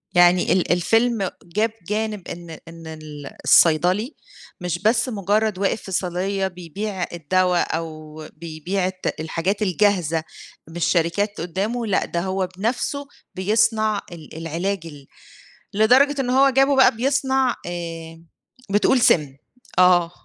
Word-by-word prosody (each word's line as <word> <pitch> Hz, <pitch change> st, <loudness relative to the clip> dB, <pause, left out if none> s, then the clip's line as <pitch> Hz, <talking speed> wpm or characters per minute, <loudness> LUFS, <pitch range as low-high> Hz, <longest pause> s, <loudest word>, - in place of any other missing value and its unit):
يعني 175 Hz, 0 st, +5 dB
ال 185 Hz, -, +1 dB
الفيلم 225 Hz, +3 st, +1 dB
جاب 210 Hz, +6 st, -1 dB, 0.2 s
جانب 210 Hz, -2 st, -3 dB
إن 170 Hz, 0 st, -8 dB, 0.2 s
إن 165 Hz, -1 st, -11 dB
ال 155 Hz, -2 st, -9 dB
الصيدلي 180 Hz, -, +4 dB, 0.5 s
مش 175 Hz, -1 st, -2 dB
بس 225 Hz, +3 st, +2 dB
مجرّد 210 Hz, -1 st, 0 dB
واقف 200 Hz, +2 st, 0 dB
في 190 Hz, -, -9 dB
صيدلية 190 Hz, +2 st, -1 dB
بيبيع 185 Hz, +2 st, -5 dB
الدوا، 180 Hz, +2 st, +1 dB, 0.2 s
أو 155 Hz, -2 st, -8 dB, 0.2 s
بيبيع 170 Hz, +4 st, -3 dB
الت 185 Hz, 0 st, -3 dB
الحاجات 165 Hz, +6 st, -2 dB
الجاهزة 185 Hz, -5 st, +1 dB, 0.5 s
من 165 Hz, -, -12 dB
الشركات 175 Hz, +4 st, 0 dB
قدّامُه، 200 Hz, +8 st, -2 dB
لأ 200 Hz, -, +1 dB
ده 170 Hz, -, -3 dB
هو 190 Hz, 0 st, -1 dB
بنَفسُه 255 Hz, +7 st, -2 dB, 0.3 s
بيصنَع 215 Hz, +2 st, +1 dB
ال 160 Hz, -4 st, -11 dB
العلاج 170 Hz, +5 st, -2 dB
ال 145 Hz, -4 st, -11 dB, 0.7 s
لدرجة 260 Hz, +7 st, +4 dB
إن 250 Hz, -2 st, -1 dB
هو 270 Hz, +2 st, +5 dB
جابُه 270 Hz, +1 st, +3 dB
بقى 265 Hz, -4 st, +5 dB
بيصنَع 265 Hz, 0 st, +1 dB
آآ، 165 Hz, -1 st, -7 dB, 0.5 s
بتقول 210 Hz, +6 st, +3 dB
سِمّ، 150 Hz, -, +3 dB, 0.4 s
آه 180 Hz, -2 st, +5 dB
185 Hz, 125 wpm, -22 LUFS, 170-215 Hz, 0.7 s, يعني